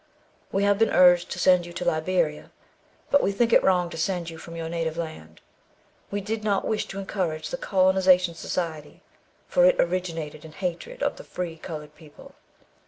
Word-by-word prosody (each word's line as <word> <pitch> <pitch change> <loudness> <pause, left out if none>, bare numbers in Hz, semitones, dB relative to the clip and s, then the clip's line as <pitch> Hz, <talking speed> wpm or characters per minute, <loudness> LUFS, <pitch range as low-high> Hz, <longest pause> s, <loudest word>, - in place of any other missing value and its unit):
We 195 - +1
have 200 0 +3
been 225 - +4
urged 180 -1 +5
to - - -5
send 180 -2 +4
you 175 - -10
to - - -5
Liberia, 160 -1 0 0.6
but 285 - +5
we - - +1
think 230 +3 +1
it - - +7
wrong 180 -2 +3
to - - -7
send 175 -1 -1
you 165 - -10
from 165 +1 -10
your 165 -1 -4
native 165 -1 -3
land. 155 - -7 0.7
We 205 0 -3
did 215 +2 -4
not 200 -2 0
wish 215 - -1
to 195 - -8
encourage 175 -6 -3
the 260 - -2
Colonization 185 -4 +3
Society, 160 -3 -5 0.4
for - - +3
it - - +5
originated 165 - -2
in 160 -1 -12
hatred 185 - -4
of - - 0
the - - -10
free 175 -2 -5
coloured 150 -2 -8
people. 155 -2 -16
180 Hz, 185 wpm, -25 LUFS, 160-195 Hz, 0.7 s, it